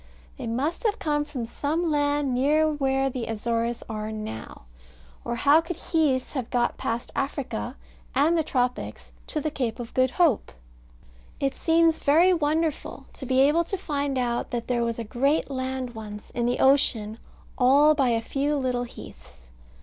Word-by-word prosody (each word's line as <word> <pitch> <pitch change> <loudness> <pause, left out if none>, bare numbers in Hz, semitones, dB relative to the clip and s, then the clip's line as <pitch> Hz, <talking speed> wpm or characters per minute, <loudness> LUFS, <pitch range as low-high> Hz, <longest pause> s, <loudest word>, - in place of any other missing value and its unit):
They - - -6
must 275 - -2
have 435 +1 +2
come 295 -5 0
from 270 -6 -5
some 315 +7 -1
land 290 -2 +1
near 295 +5 +3
where 270 -3 +1
the 245 -2 -4
Azores 230 +1 -2
are 215 -1 -4
now; 215 - -7 0.6
or 235 - -2
how 285 +6 +5
could 330 +1 -5
heaths 300 -6 0
have 260 -5 -3
got 240 -1 +1
past 230 +1 -3
Africa, 270 - -3 0.4
and 300 +5 +4
the 325 - +3
tropics, 250 -3 -2 0.2
to 310 - -2
the 305 +1 -2
Cape 250 -6 -2
of 240 -1 -7
Good 255 0 +3
Hope? 315 - +1 0.9
It 275 -1 0
seems 330 -1 +3
very 335 +6 +5
wonderful, 315 -1 -1
to 265 - -8
be 260 +1 +3
able 300 +5 +4
to 390 - -3
find 285 -6 -2
out 240 -1 -1
that 235 -1 -4
there 240 -1 +1
was 230 -1 -2
a 230 - -3
great 275 +7 0
land 260 -1 -3
once 210 -2 -9
in 240 0 -1
the 245 - 0
ocean 230 -5 +2 0.4
all 280 +4 +5
by 275 -4 +2
a 230 -1 +1
few 285 +5 -1
little 250 -3 -1
heaths. 65 - -14
265 Hz, 170 wpm, -26 LUFS, 235-300 Hz, 0.9 s, how